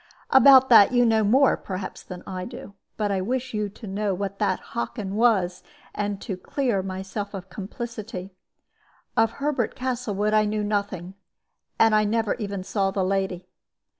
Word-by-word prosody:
"About 265 -1 +8
that 220 -3 +8
you 245 0 +4
know 220 -1 +3
more, 260 +6 +4
perhaps, 185 0 -6
than 180 -1 -9
I 185 -1 -5
do. 220 -1 -9 0.2
But 210 -2 0
I 190 -1 0
wish 255 +5 -2
you 210 -1 -1
to 210 +3 -12
know 200 0 -1
what 200 +1 -4
that 195 -3 +1
Hockin 190 - -3
was, 205 -5 +2 0.3
and 205 -1 -2
to 200 - -4
clear 235 +1 -1
myself 195 +2 -5
of 190 -1 -8
complicity. 210 -2 -6 0.8
Of 225 0 +3
Herbert 275 -4 -1
Castlewood 235 -5 -1
I 215 0 +4
knew 210 0 -1
nothing, 200 -3 -2 0.6
and 225 -1 +5
I 215 0 +4
never 220 0 +1
even 200 -4 -5
saw 195 0 0
the 195 0 -1
lady. 190 -2 -1
205 Hz, 165 wpm, -25 LUFS, 195-230 Hz, 0.8 s, About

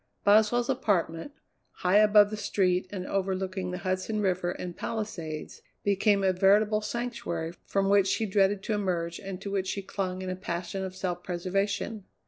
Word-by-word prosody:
Boswell's 220 +4 +4
apartment, 195 - 0 0.4
high 185 +2 +2
above 210 -1 +6
the - - -2
street 190 -3 +1
and 185 -3 -5
overlooking 190 -1 -2
the 180 - -3
Hudson 185 +3 -2
River 185 -3 0
and 175 -1 -5
Palisades, 170 -9 -5 0.2
became 200 0 +2
a 190 -1 +3
veritable 205 +3 +4
sanctuary 210 -8 -3
from 195 0 +1
which 200 -1 +4
she 220 - +1
dreaded 195 0 +2
to 220 - -1
emerge 175 -5 -1
and 195 -2 -6
to 200 - -5
which 190 -1 -1
she 200 +1 -3
clung 185 -1 -3
in 185 - -4
a - - -2
passion 185 +1 -4
of 185 -1 -5
self 180 -2 -3
preservation. 195 +4 -2
195 Hz, 165 wpm, -28 LUFS, 185-205 Hz, 0.4 s, above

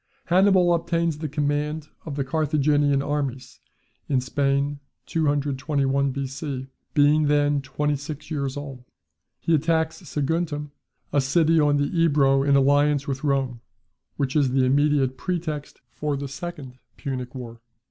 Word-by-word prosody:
Hannibal 185 -1 +4
obtains 165 -2 0
the 155 -1 -3
command 150 +1 -1 0.2
of 145 - -4
the 140 - -1
Carthaginian 145 -1 +2
armies 135 -3 -3 0.5
in 135 -3 +3
Spain, 140 +2 0 0.3
221 140 -2 0
B.C., 135 0 -4 0.3
being 150 +1 +4
then 145 -1 +2
twenty 145 +2 -1
six 150 +2 -7
years 140 -3 -2
old. 135 -3 -7 0.6
He 165 - 0
attacks 160 +1 +1
Saguntum, 150 -1 -2 0.4
a 145 - +4
city 160 +4 +3
on 145 -1 +3
the 145 +4 -1
Ebro 140 -4 +4
in 140 0 +3
alliance 145 +1 +3
with 135 0 -3
Rome, 135 -4 0 0.6
which 135 0 -1
is 145 -3 +3
the 130 -1 +3
immediate 140 -1 +2
pretext 160 -5 -4
for 150 -2 -2
the 140 0 -4
second 140 -3 -8 0.2
Punic 130 -2 -5
war. 120 -2 -8
145 Hz, 135 wpm, -24 LUFS, 135-150 Hz, 0.6 s, Hannibal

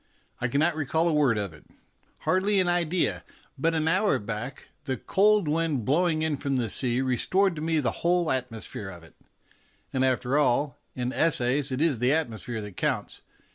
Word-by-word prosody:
I 125 - 0
can 125 - -1
not 160 +1 +2
recall 160 +2 0
a 165 - +2
word 140 -7 +3
of 100 -5 -3
it 75 - -16 0.6
hardly 195 +2 +2
an 185 - +2
idea 175 0 0 0.3
but 165 +4 0
an 160 0 0
hour 190 +6 +3
back 115 +5 -6 0.2
the 130 -2 -2
cold 205 - +3
wind 150 -6 0
blowing 155 +2 +2
in 155 -2 0
from 140 0 -2
the 120 -5 0
sea 125 -1 +1
restored 175 +9 +1
to - - -4
me 160 0 +1
the 135 - 0
whole 175 -1 +2
atmosphere 115 -5 -4
of 90 -3 -11
it; 80 - -17 0.8
and, 130 - +1
after 130 +2 +1
all, 140 -1 +1 0.2
in 125 0 -2
essays 140 -3 +1
it 130 +4 0
is 150 -8 +1
the 125 +1 +2
atmo 140 -7 0
sphere 115 -3 -5
that 105 -3 -10
counts. - - -2
145 Hz, 190 wpm, -27 LUFS, 125-165 Hz, 0.8 s, word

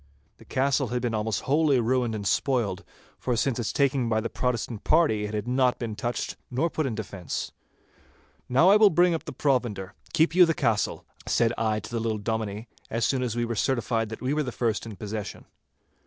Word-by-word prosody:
The - - -15
castle 135 0 +1
had 125 +2 -1
been 120 -2 0
almost 110 -2 -1
wholly 145 -1 +3
ruined 120 -1 +1
and 100 -2 -5
spoiled, 115 -3 0 0.4
for 125 -2 -1
since 125 +1 0
its 115 - -1
taking 135 -4 +1
by 110 -1 +2
the 115 +1 -4
Protestant 120 -3 -2
party, 130 -11 +3
it 105 +1 -4
had 105 +2 -3
not 125 0 +2
been 115 -3 -4
touched 120 +3 -3
nor 145 +7 0
put 155 -3 -1
in 115 - -3
defence. 100 -6 -5 1.0
'Now 135 +9 +5
I 205 - +7
will 215 -1 +7
bring 175 0 +4
up 165 - -3
the - - -5
provender. 120 -9 -1 0.2
Keep 160 +1 +3
you 180 -1 +7
the 165 - +1
castle,' 110 -2 0 0.2
said 115 0 +2
I 110 -1 0
to 105 - -10
the 115 - -1
little 110 -1 -1
Dominie, 110 +1 -3 0.2
as 115 +1 0
soon 130 -2 +1
as 120 -3 -2
we 120 0 0
were 115 - -2
certified 115 -1 0
that 110 - -7
we 130 +3 0
were 150 0 +1
first 115 -1 -1
in 110 - -7
possession. 105 +1 -6
120 Hz, 205 wpm, -26 LUFS, 110-135 Hz, 1.0 s, I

